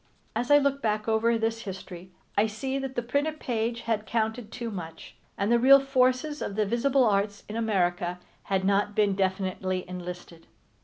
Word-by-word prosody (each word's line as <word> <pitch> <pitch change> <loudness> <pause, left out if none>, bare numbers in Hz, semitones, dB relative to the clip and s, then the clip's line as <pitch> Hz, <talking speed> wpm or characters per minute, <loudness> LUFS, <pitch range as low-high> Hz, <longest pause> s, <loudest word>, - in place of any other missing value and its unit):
As 245 - -1
I 290 - +8
look 280 -1 +1
back 215 -2 -1
over 225 +1 +2
this 225 0 -1
history 185 -3 -8 0.3
I 210 +2 +3
see 265 +6 -3
that 270 -1 -5
the 240 - -1
printed 290 +5 -1
page 235 0 -2
had 220 -2 -2
counted 220 0 -2
too 235 -2 -5
much, 170 -5 -8 0.2
and 200 +3 0
the 235 - +5
real 275 +3 +8
forces 270 +2 +1
of 200 - -3
the 215 0 +1
visible 255 +5 +2
arts 205 -2 +1
in 210 - -6
America 180 -5 0 0.3
had 190 -1 0
not 200 +1 +1
been 205 -2 +3
definitely 185 -1 -1
enlisted. 180 -3 -8
220 Hz, 175 wpm, -27 LUFS, 195-245 Hz, 0.3 s, I